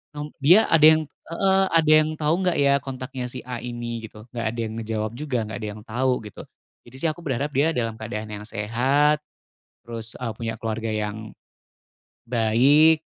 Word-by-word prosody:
Nom 150 0 -6
dia 175 +11 +7
ada 165 - +5
yang 155 - -1
heeh, 190 +6 0
"Ada 160 -2 +4
yang 155 - -1
tau 150 0 +1
nggak, 180 -2 +1
ya, 140 -1 +4
kontaknya 130 -2 -6
si 125 +1 -7
A 125 -1 -5
ini?" 120 -1 -5
Gitu. 105 0 -13
Nggak 115 -2 -3
ada 120 +1 -6
yang 110 - -6
ngejawab 110 -1 -3
juga, 135 0 -3
nggak 105 -1 -6
ada 110 - -4
yang - - -11
tau, 125 +3 0
gitu, 105 - -9 0.5
jadi, 120 - -14
sih, 165 - +1
aku 155 - -11
berharap 140 -1 -2
dia 145 +5 +3
dalam 115 -2 -2
keadaan 110 -1 -5
yang 105 0 -7
sehat, 130 +9 +1 0.7
terus, 115 -1 -4
eee, 120 -2 -3
punya 115 0 -4
keluarga 115 0 -3
yang 110 0 -4 0.9
baik, 135 +8 +4
125 Hz, 180 wpm, -24 LUFS, 110-150 Hz, 0.9 s, dia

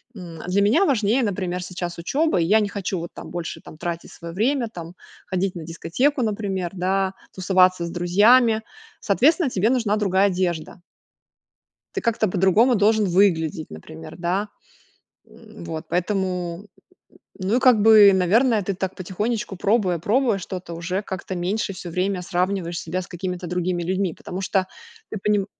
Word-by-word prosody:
м, 170 -5 -9
для 190 +3 +2
меня 235 - +4
важнее, 240 - +2
например, 185 -4 -2
сейчас 175 -1 -5
учеба, 290 - +1
и - - +2
я 210 +6 +4
не 205 - -1
хочу 195 -2 -3
вот 170 +1 -6
там - - -9
больше 175 -1 -5
там - - -13
тратить 170 +1 -5
свое 170 -1 -9
время, 240 +6 +1
там 170 -5 -9 0.3
ходить 190 0 -1
на 170 - -6
дискотеку 250 - 0
например, 200 -5 -2
да, 190 +1 0 0.2
тусоваться 185 -1 +3
с - - -5
друзьями. 220 +6 +4 0.4
Соответственно 285 - +3
тебе 205 +2 +1
нужна 230 -5 +1
другая 195 -1 +2
одежда. 180 -3 -2 1.2
Ты - - -1
как-то 225 -2 +1
по-другому 195 +7 +3
должен 215 +1 +3
выглядеть 175 -3 +1
например, 80 0 -10
да, 185 +4 -1 0.8
м, 220 -4 -14
вот. 160 -1 -6
Поэтому, 180 0 -2 0.7
ну, 195 +4 0
и - - +2
как 250 -4 +5
бы, 210 -2 +8
наверное, 215 +5 +3
ты 195 +1 -2
так 190 0 -4
потихонечку 205 +3 -3
пробуя 195 -2 +1
пробуя 225 - +1
что-то, 180 -2 -7
уже 180 +3 -3
как-то 190 -2 -6
меньше 190 +4 -2
всё 185 -1 -8
время 185 +2 -1
сравниваешь 180 -1 -1
себя 185 - -3
с - - -10
какими-то 180 0 -5
другими 180 0 -1
людьми, 185 +1 -1
потому 185 +2 -7
что 190 0 0 0.4
ты 215 - -4
поним 205 0 +1
190 Hz, 160 wpm, -23 LUFS, 175-215 Hz, 1.2 s, бы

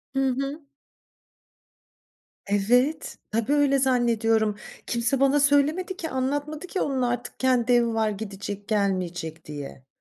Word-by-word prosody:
Hı 270 0 +2
hı. 275 +3 -4 1.8
Evet, 245 +9 +1
tabii 230 +5 0
öyle 285 -2 +3
zannediyorum. 225 -4 +2 0.3
Kimse 240 +3 0
bana 275 +2 +4
söylemedi 295 +6 +2
ki, 320 -3 -4
anlatmadı 290 +5 -2
ki, 375 - -2
onun 270 -2 0
artık 245 0 -2
kendi 250 -2 +2
evi 235 -1 +3
var, 220 -1 +1
gidecek, 200 -1 -6
gelmeyecek 185 -6 -2
diye. 145 -3 -8
245 Hz, 120 wpm, -25 LUFS, 215-280 Hz, 1.8 s, bana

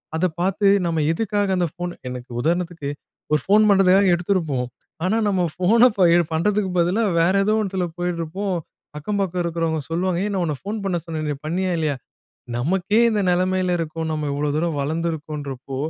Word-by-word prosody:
அத 165 +3 +1 0.2
பார்த்து 195 +2 +1 0.2
நம்ம 165 -2 0
எதுக்காக 205 +2 0
அந்த 175 -1 +1
ஃபோன் 175 0 -4 0.2
எனக்கு 125 0 -7
உதாரணத்துக்கு 170 -1 -1 0.4
ஒரு 150 - +3
ஃபோன் 210 +2 +5
பண்ணுறதுக்காக 195 -1 +5
எடுத்துருப்போம். 165 -8 -1 0.4
ஆனா 215 +5 +2
நம்ம 190 -3 +1
ஃபோன 185 +6 +3 0.4
எ - - +6 0.2
பண்ணுறதுக்கு 195 +4 +1
பதிலா, 180 +7 +2 0.2
வேற 170 +3 +3
ஏதோ 215 +2 +2
ஒண்ணத்துல 190 -3 -1
போயிட்டுருப்போம். 175 +2 -2 0.4
அக்கம் 200 +7 -2
பக்கம் 180 -2 -1
இருக்கிறவங்க 165 -1 -1
சொல்லுவாங்க 175 +1 0
"ஏய்! 210 - -1
நான் 185 -2 0
உன்னை 150 -3 -2
ஃபோன் 210 +2 -3
பண்ண 185 -3 0
சொன்னனே. 155 -3 -3
பண்ணியா? 185 +4 -1
இல்லையா?" 155 -3 0 0.6
நமக்கே 190 - +1
இந்த 210 - 0
நெலைமையில 185 0 +1
இருக்கோம். 160 0 -3
நம்ம 155 -1 -2
இவ்வளோ 145 +1 -1
தூரம் 165 -1 0
வளர்ந்துருக்கோம்ன்றப்போ, 150 -3 -4
175 Hz, 160 wpm, -22 LUFS, 160-190 Hz, 0.6 s, எ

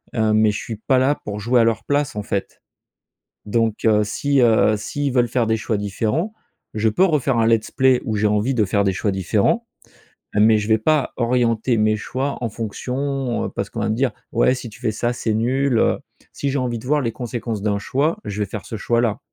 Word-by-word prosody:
heu, 110 -2 +2
mais 110 0 +4
je 105 - -4
suis 115 - -6
pas 130 +4 +2
là 140 +3 +2
pour 105 0 -4
jouer 120 +4 +2
à - - +5
leur 115 -1 +1
place 145 -3 0
en 105 - -2
fait. 100 -1 -4 0.8
Donc, 115 +1 0
heu, 105 -1 +4
si, 140 +6 +1
heu, 110 -2 +4
s'ils 140 +6 -3
veulent 120 -2 +3
faire 120 -1 +1
des 110 - +2
choix 110 0 -2
différents, 110 - -2 0.4
je 110 +1 +1
peux 145 - +3
refaire 140 -7 +1
un 115 0 +3
let's 115 -1 +1
play 130 -1 +3
où 110 - -1
j'ai 105 +1 +2
envie 105 +5 +1
de 110 -3 +2
faire 100 +1 +1
des 95 - +1
choix 100 +2 -1
différents, 100 - +1 0.7
mais 110 +1 +5
je 105 - -3
vais 110 0 +4
pas 150 +5 +1
orienter 120 -1 +1
mes 110 0 +2
choix 135 +6 -3
en 115 - 0
fonction, 125 +4 -3
heu, - - -3
parce - - -4
qu'on - - -5
va - - 0
me 110 - +1
dire: 130 +2 0 0.2
«Ouais, 120 +2 +3
si 125 -3 -7
tu 120 - -15
fais 115 -4 0
ça 120 +3 -1
c'est 110 -2 -2
nul, 130 +3 +1
heu». - - +2 0.3
Si 140 - -3
j'ai 140 - -1
envie 120 -2 -2
de 120 - -11
voir 150 +1 +2
les 115 -3 -1
conséquences 120 -3 -4
d'un 105 -1 0
choix, 140 - 0
je 105 +1 -5
vais 105 - -1
faire 110 -4 -6
ce 115 - -5
choix 115 +3 +1
là. 115 -2 0
115 Hz, 235 wpm, -21 LUFS, 110-130 Hz, 0.8 s, à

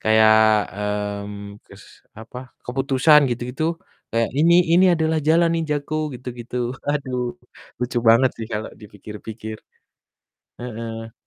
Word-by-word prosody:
kayak, 110 0 +5 0.9
mmm, 100 0 -9
kes - - -15 0.4
apa, 115 +2 -9 0.3
keputusan 135 +4 +4
gitu-gitu, 125 +5 -3 0.5
kayak, 115 0 +1
"Ini 165 +3 +5 0.2
ini 180 +2 +6
adalah 160 -1 0
jalan 165 +1 +4
ninjaku!" 150 -2 -3 0.2
Gitu-gitu. 120 -1 -8 0.3
Aduh, 135 -4 -2 0.6
lucu 120 0 -1
banget 120 +3 +5
sih 115 - -5
kalau 105 0 -3
dipikir-pikir. 105 +2 -9 1.0
Heeh. 115 -1 -6
120 Hz, 105 wpm, -22 LUFS, 110-145 Hz, 1.0 s, ini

